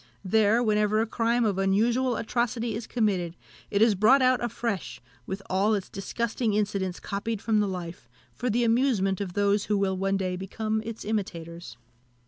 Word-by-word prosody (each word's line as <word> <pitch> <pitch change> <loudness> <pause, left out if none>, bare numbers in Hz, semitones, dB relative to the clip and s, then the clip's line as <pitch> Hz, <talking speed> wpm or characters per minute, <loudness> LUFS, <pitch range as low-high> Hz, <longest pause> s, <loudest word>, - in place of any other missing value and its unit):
There, 220 +4 +3
whenever 210 -1 +2
a 225 - +2
crime 235 +1 +1
of 200 -3 0
unusual 230 +6 +2
atrocity 235 0 -1
is 220 +1 -5
committed, 190 -7 0 0.3
it 205 +1 +3
is 225 -2 +5
brought 225 +8 +5
out 255 -1 +3
afresh, 230 -5 -3 0.3
with 195 +1 -5
all 200 +3 +2
its 195 -2 -4
disgusting 225 +2 -2
incidents 200 -3 -1
copied 215 +2 -3
from 220 0 +1
the 205 - +2
life, 175 -9 -6 0.2
for 250 - -3
the 240 +2 +1
amusement 225 -5 +2
of 185 -3 -4
those 205 0 +2
who 210 - +1
will 195 -1 +1
one 195 +1 0
day 185 -1 -2
become 215 +4 -2
its 225 0 -7
imitators. 170 - -4
210 Hz, 170 wpm, -27 LUFS, 195-230 Hz, 0.3 s, is